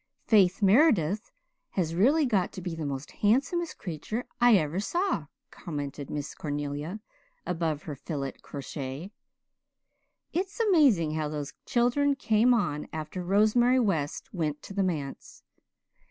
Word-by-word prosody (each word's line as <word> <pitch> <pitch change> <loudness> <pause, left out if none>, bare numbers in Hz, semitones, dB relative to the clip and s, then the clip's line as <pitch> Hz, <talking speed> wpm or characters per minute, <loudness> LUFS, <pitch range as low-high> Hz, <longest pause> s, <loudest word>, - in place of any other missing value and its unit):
'" - - -59
"Faith 195 -2 +4
Meredith 205 - +4 0.4
has 165 -4 -1
really 275 - +4
got 205 -8 +1
to - - -8
be 175 -2 -4
the 160 -2 -4
most 135 0 -5
handsomest 280 - +1
creature 200 +7 -4
I 240 -2 +7
ever 160 -1 +1
saw," 340 - -1 0.2
commented 145 -3 -6
Miss 145 -1 -4
Cornelia 145 +6 -4 0.4
above 160 -4 -1
her 155 - -5
filet 140 -1 -4
crochet. 140 +4 -6 1.2
"It's 380 +6 -2
amazing 290 - +4
how 155 -1 -1
those 150 -1 -5
children 265 +4 +2
came 225 -1 +3
on 175 -11 0
after 160 +3 -5
Rosemary 215 +7 +4
West 195 - -1
went 155 -5 -2
to - - -9
the 200 - 0
manse. 155 -7 -4
185 Hz, 135 wpm, -28 LUFS, 150-240 Hz, 1.2 s, I